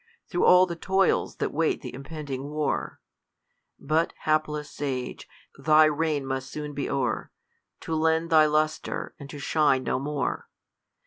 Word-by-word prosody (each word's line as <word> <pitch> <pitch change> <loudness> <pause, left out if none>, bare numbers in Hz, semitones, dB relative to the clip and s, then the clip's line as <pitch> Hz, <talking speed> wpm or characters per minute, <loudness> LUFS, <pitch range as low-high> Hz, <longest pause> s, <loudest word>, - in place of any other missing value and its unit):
' 475 - -46
Through 175 - +2
all 180 +1 +7
the 170 -2 -5
toils 190 +3 +1
that - - -2
wait 160 +1 0
th' 125 - -7
impending 140 0 -6
war, 150 -1 -2 0.8
But, 155 +3 0
hapless 155 -1 0
sage, 130 -3 -4 0.3
thy 155 0 +6
reign 155 -2 0
must 135 0 -3
soon 150 0 -6
be 140 -1 -3
o'er, 125 -5 -1 0.5
To 165 - -4
lend 160 +1 +1
thy 155 -1 +6
lustre, 155 +1 -1
and 140 -1 -9
to 145 - -8
shine 140 -2 +2
no - - -1
more. 140 -1 -3
150 Hz, 150 wpm, -26 LUFS, 140-160 Hz, 0.8 s, all